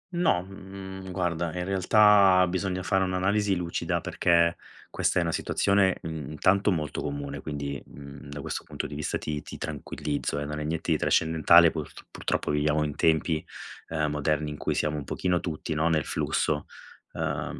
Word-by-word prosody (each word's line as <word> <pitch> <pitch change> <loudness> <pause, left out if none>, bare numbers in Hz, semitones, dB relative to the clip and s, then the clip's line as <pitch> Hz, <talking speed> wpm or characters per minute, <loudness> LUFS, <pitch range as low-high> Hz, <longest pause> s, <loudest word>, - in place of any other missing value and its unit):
No, 165 - +2
mhmm, 95 -1 -9
guarda, 85 -2 -1
in 90 - -2
realtà 95 0 +5
bisogna 95 0 -2
fare 95 0 +2
un'analisi 95 +2 +1
lucida, 85 -1 -2
perché 85 -1 +2 0.3
questa - - 0
è 90 - +3
una 85 - -1
situazione, 100 +2 +2
mhmm, 80 -4 -5
intanto, 95 +6 +3
molto 75 -4 -2
comune, 70 -1 -5
quindi, 70 -2 -4
mhmm, 70 0 -12
da 70 +1 -7
questo - - -4
punto - - -5
di - - -7
vista 75 +1 -2
ti 75 -1 -4
ti - - -9
tranquillizzo, 70 -1 -3
eh, 75 - -2
non 75 +1 -4
è - - -3
niente 80 +2 -2
di 80 - +2
trascendentale, 80 +1 +5
purt 80 -3 -7
purtroppo - - -2
viviamo 75 +1 +1
in 75 -1 -3
tempi, 80 0 +2 0.5
uhm, 75 -2 -1
moderni 75 0 0
in 75 - -7
cui - - -2
siamo 75 0 0
un 75 - -4
pochino 90 +5 0
tutti, 80 -2 -4
no, 80 +2 +1
nel 80 -3 +1
flusso. 75 -1 -1 0.5
Uhm, - - -3
80 Hz, 175 wpm, -27 LUFS, 75-95 Hz, 0.5 s, realtà